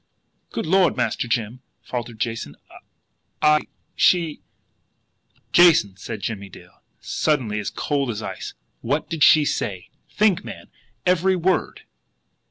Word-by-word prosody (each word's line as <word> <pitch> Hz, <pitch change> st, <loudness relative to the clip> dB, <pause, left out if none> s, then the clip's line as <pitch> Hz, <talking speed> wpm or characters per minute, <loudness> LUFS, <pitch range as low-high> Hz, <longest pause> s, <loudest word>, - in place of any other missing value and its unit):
"Good -, -, -4 dB
Lord, 185 Hz, +3 st, +3 dB
Master 125 Hz, -, -1 dB
Jim!" 115 Hz, +2 st, -2 dB, 0.2 s
faltered 120 Hz, -2 st, -5 dB
Jason. 115 Hz, -, -3 dB, 0.8 s
"I 150 Hz, 0 st, +3 dB, 0.3 s
she 170 Hz, -4 st, +2 dB, 0.5 s
" -, -, -42 dB
"Jason," 160 Hz, -, +5 dB
said 110 Hz, +3 st, -7 dB
Jimmie 100 Hz, -3 st, -4 dB
Dale, -, -, -16 dB, 0.2 s
suddenly 125 Hz, -9 st, -1 dB
as 105 Hz, -, -3 dB
cold 140 Hz, -3 st, -2 dB
as 110 Hz, -1 st, -4 dB
ice, -, -, -6 dB, 0.3 s
"what 145 Hz, +8 st, -2 dB
did 160 Hz, -3 st, +1 dB
she 155 Hz, +1 st, +7 dB
say? 95 Hz, -9 st, -3 dB, 0.2 s
Think, 210 Hz, -4 st, +2 dB
man! -, -, -10 dB, 0.3 s
Every 185 Hz, +1 st, +3 dB
word!" 185 Hz, +1 st, 0 dB
140 Hz, 125 wpm, -22 LUFS, 110-165 Hz, 0.8 s, she